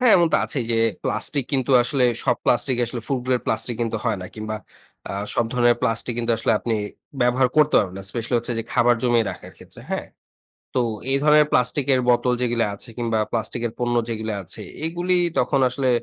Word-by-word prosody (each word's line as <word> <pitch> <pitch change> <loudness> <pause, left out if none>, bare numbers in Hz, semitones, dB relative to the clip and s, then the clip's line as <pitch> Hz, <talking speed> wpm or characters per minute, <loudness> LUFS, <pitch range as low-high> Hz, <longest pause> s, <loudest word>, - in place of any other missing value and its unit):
হ্যাঁ, 250 -3 +5
এমন 170 -2 +4
তো - - +6
আছেই 130 -6 -2
যে 115 - +2 0.3
প্লাস্টিক 140 -4 -1
কিন্তু 135 -1 0
আসলে 125 +1 +1 0.2
সব 125 -3 +2
প্লাস্টিক 125 +1 +2
আসলে 120 +1 -5
ফুট 130 -3 -1
গেড 125 -1 +2
প্লাস্টিক 115 +1 -1
কিন্তু 115 -1 -1
হয় 100 - 0
না। - - -6
কিংবা 110 0 -4 0.5
আ - - -4 0.2
সব 120 - +2
ধরনের 120 -1 +3
প্লাস্টিক 115 0 0
কিন্তু 115 0 +1
আসলে 110 - +1
আপনি 115 +1 -2 0.5
ব্যবহার 125 +1 +3
করতে 150 -1 +4
পারবেন 95 -2 -1
না। - - -7
স্পেশালি 115 +1 -3
হচ্ছে 120 +1 -3
যে, - - -1
খাবার 120 0 +4
জমিয়ে 120 -2 +3
রাখার - - -10
ক্ষেত্রে, - - -14
হ্যাঁ। - - -2 0.7
তো 125 - +3 0.3
এই 135 - +3
ধরনের 150 0 +6
প্লাস্টিকের 130 +1 +2
বোতল 125 +1 +3
যেগুলি 120 -1 +1
আছে 100 +4 -8
কিংবা 115 -2 0
প্লাস্টিকের 115 +1 -2
পণ্য 120 0 0
যেগুলি 110 -1 -3
আছে 90 - -8 0.2
এগুলি 175 +2 0 0.2
তখন 140 - +1
আসলে 135 -1 -1
120 Hz, 195 wpm, -22 LUFS, 115-130 Hz, 0.7 s, তো